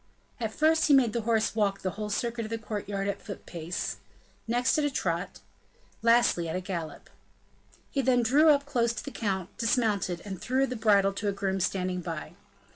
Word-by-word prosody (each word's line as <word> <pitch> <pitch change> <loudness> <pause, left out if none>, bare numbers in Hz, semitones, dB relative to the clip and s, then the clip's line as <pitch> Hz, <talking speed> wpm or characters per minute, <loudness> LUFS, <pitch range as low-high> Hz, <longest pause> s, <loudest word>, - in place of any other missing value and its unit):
At 225 -2 -2
first, 315 +5 +3
he 290 - +6
made 245 -5 +4
the 235 - 0
horse 220 -1 +2
walk 205 -3 0
the 185 - 0
whole 210 +1 -5
circuit 235 +2 -2
of 215 - -6
the 230 - -2
court 215 -2 -5
yard 195 -1 -2
at 200 - -1
a - - -22
foot 200 - -8
pace; 170 0 -4 0.5
next 245 +5 +2
at - - +1
a 290 - +2
trot; 180 -8 -2 0.6
lastly 230 -7 +3
at - - -3
a - - 0
gallop. 180 -4 -6 0.8
He 275 - +1
then 250 -1 +3
drew 290 +7 +5
up 285 -1 +4
close 240 -5 +1
to 225 - -6
the 280 - -6
count, 190 -7 -3
dismounted, 215 -7 0
and 190 -3 -6
threw 265 +2 +1
the 255 - -4
bridle 200 -3 +3
to 205 +1 -3
a - - +2
groom 195 -1 -1
standing 185 0 -1
by. 165 -3 -6
215 Hz, 205 wpm, -28 LUFS, 190-245 Hz, 0.8 s, he